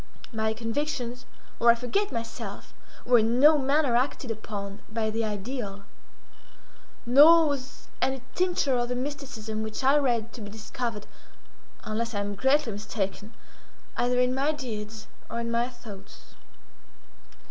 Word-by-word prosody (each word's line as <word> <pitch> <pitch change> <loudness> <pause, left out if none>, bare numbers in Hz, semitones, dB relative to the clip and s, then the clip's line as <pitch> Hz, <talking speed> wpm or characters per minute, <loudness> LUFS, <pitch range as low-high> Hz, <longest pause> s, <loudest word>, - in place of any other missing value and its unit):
My 220 0 0
convictions, 245 +1 -3 0.3
or 235 - +5
I - - +3
forget 250 - -1
myself, 230 -2 -6 0.3
were 245 -1 +6
in 230 +3 +2
no 300 +2 +7
manner 275 -1 +2
acted 255 0 0
upon 205 -2 -6
by 220 0 -1
the 225 +1 -1
ideal, 205 -1 -4 1.2
nor 310 +6 +8
was 280 -1 -4
any 265 -1 0
tincture 355 -7 +1
of 240 0 -1
the 250 - -1
mysticism 255 -5 -4
which 220 +4 -4
I 275 +3 +5
read 235 -5 0
to 240 - -8
be 205 - -6
discovered, 220 0 -4 0.8
unless 230 +1 -2
I - - 0
am 205 0 -3
greatly 265 +3 +2
mistaken, 205 +1 -4 0.6
either 250 +1 +1
in 250 0 +3
my 280 +4 +1
deeds 220 -6 -6 0.2
or 235 - -3
in 235 0 -2
my 235 +1 +1
thoughts. 220 -6 -12
240 Hz, 140 wpm, -27 LUFS, 220-265 Hz, 1.2 s, nor